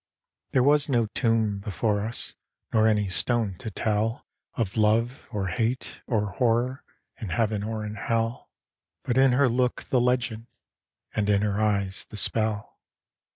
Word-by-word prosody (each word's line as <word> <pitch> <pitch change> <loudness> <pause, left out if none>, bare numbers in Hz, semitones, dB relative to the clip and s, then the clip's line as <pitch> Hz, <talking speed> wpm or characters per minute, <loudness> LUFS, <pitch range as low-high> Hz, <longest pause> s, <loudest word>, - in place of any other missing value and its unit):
There 130 - +4
was 145 +1 +4
no 120 -4 +3
tomb 110 -2 +1
before 100 +1 -1
us, 110 +3 -2 0.4
Nor 110 0 +4
any 105 -2 +2
stone 110 +3 +1
to - - -5
tell 110 +3 -1 0.3
Of 105 -5 -2
love, 115 +4 +1
or 100 -5 -2
hate, 115 +9 -2
or 105 -4 0
horror 125 +2 +1 0.4
In 110 -7 -5
heaven 110 0 0
or 110 0 -3
in 105 - -5
hell 115 +2 -2 0.5
But 125 +2 +1
in 135 -1 +5
her 135 +1 +4
look 125 +1 0
the 125 - +1
legend, 120 -2 0 0.7
And 105 -1 0
in 100 0 +3
her 105 0 0
eyes 100 -2 0
the 105 - -8
spell. 110 0 -2
110 Hz, 155 wpm, -26 LUFS, 105-120 Hz, 0.7 s, in